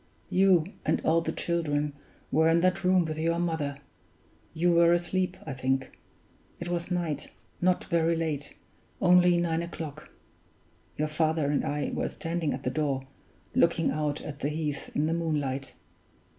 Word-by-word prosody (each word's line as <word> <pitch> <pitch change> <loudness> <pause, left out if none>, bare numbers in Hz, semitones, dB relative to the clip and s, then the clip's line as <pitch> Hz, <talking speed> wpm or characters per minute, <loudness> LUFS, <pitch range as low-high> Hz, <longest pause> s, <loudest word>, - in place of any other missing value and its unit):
You 185 -4 +5 0.2
and - - +1
all 165 +1 +3
the 160 - -2
children 150 -4 -1 0.4
were 160 +3 +4
in 165 +1 +4
that 185 +1 +2
room 180 -1 +4
with 155 0 -4
your 165 +1 +1
mother; 160 -5 -1 0.7
you 175 +2 +2
were 170 0 +6
asleep, 180 +1 0
I 145 - -4
think; 130 0 -1 0.6
it 175 - -5
was 175 0 -2
night, 170 -5 -2 0.3
not 180 0 +2
very 165 -1 +2
late 155 -3 -3 0.4
only 180 -1 +5
nine 170 -1 +1
o'clock. 160 -3 -7 0.9
Your 155 - 0
father 155 -1 +1
and 145 - +1
I 145 0 -2
were - - -1
standing 165 -1 -2
at - - -4
the 125 - -1
door, 140 -3 -1 0.5
looking 170 -1 +3
out 150 -1 -1
at 145 -2 -7
the 145 - -1
heath 150 -2 -3
in 150 - +2
the 160 - +1
moonlight. 140 -5 -2
160 Hz, 155 wpm, -28 LUFS, 150-170 Hz, 0.9 s, were